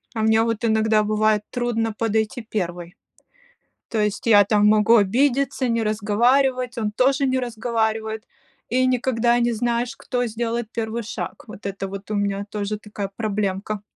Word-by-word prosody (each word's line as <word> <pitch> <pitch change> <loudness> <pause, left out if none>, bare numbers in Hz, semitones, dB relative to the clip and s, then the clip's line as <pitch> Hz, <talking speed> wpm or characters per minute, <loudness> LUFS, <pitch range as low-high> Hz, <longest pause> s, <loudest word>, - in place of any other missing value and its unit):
А 220 - -1
мне 220 0 +4
вот 230 0 -2
иногда 220 -1 +3
бывает 215 0 +2
трудно 230 -3 -1
подойти 220 +2 -1
первой. 180 -6 -4 0.9
То 225 - -2
есть 210 +1 -1
я 205 -3 +7
там 210 0 +3
могу 215 +2 +5
обидеться, 255 +5 +2
не 230 -1 +1
разговаривать, 245 +4 +1
он 215 -2 -1
тоже 270 +5 +2
не 260 0 +1
разговаривает, 220 -2 -2 0.5
и 255 +1 +2
никогда 240 -1 +2
не 240 0 +1
знаешь, 240 +3 -1
кто 245 -1 -2
сделает 230 0 -3
1 230 0 -3
шаг. 215 - -6
Вот 210 -2 -10
это 195 0 -4
вот 195 +2 -8
у - - -1
меня 200 0 -1
тоже 210 0 -3
такая 205 -2 -6
проблемка. 205 -1 -2
220 Hz, 155 wpm, -22 LUFS, 210-240 Hz, 0.9 s, я